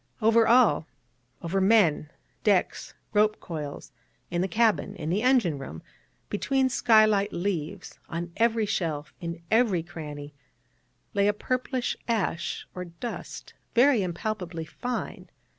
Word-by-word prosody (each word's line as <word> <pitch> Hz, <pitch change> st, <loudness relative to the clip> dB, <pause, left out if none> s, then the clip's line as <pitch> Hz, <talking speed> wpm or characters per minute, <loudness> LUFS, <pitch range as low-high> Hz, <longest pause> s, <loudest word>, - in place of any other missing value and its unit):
Over 225 Hz, 0 st, +4 dB
all 235 Hz, -9 st, +4 dB, 0.6 s
over 185 Hz, +3 st, 0 dB
men, 190 Hz, -7 st, +4 dB, 0.3 s
decks, -, -, +1 dB, 0.2 s
rope 215 Hz, 0 st, +3 dB
coils 150 Hz, -5 st, -6 dB, 0.4 s
in 175 Hz, 0 st, 0 dB
the 190 Hz, -, +1 dB
cabin, 215 Hz, 0 st, +1 dB
in 155 Hz, -2 st, -4 dB
the 200 Hz, +4 st, +1 dB
engine 235 Hz, -, +3 dB
room 80 Hz, -, -8 dB, 0.4 s
between 265 Hz, +5 st, +1 dB
skylight 215 Hz, -5 st, +4 dB
leaves 180 Hz, 0 st, -4 dB
on 170 Hz, +1 st, -4 dB
every 230 Hz, -1 st, +2 dB
shelf, 160 Hz, -7 st, -2 dB
in 170 Hz, -1 st, -5 dB
every 220 Hz, -7 st, +3 dB
cranny 150 Hz, -4 st, -8 dB, 0.8 s
lay 200 Hz, -1 st, +3 dB
a 205 Hz, -, +3 dB
purplish 255 Hz, +3 st, -2 dB
ash 205 Hz, -7 st, -1 dB
or 180 Hz, 0 st, -5 dB
dust, 175 Hz, +8 st, -7 dB, 0.2 s
very 245 Hz, -1 st, +5 dB
impalpably 180 Hz, -2 st, -3 dB
fine. 245 Hz, +10 st, -5 dB
200 Hz, 125 wpm, -27 LUFS, 170-225 Hz, 0.8 s, very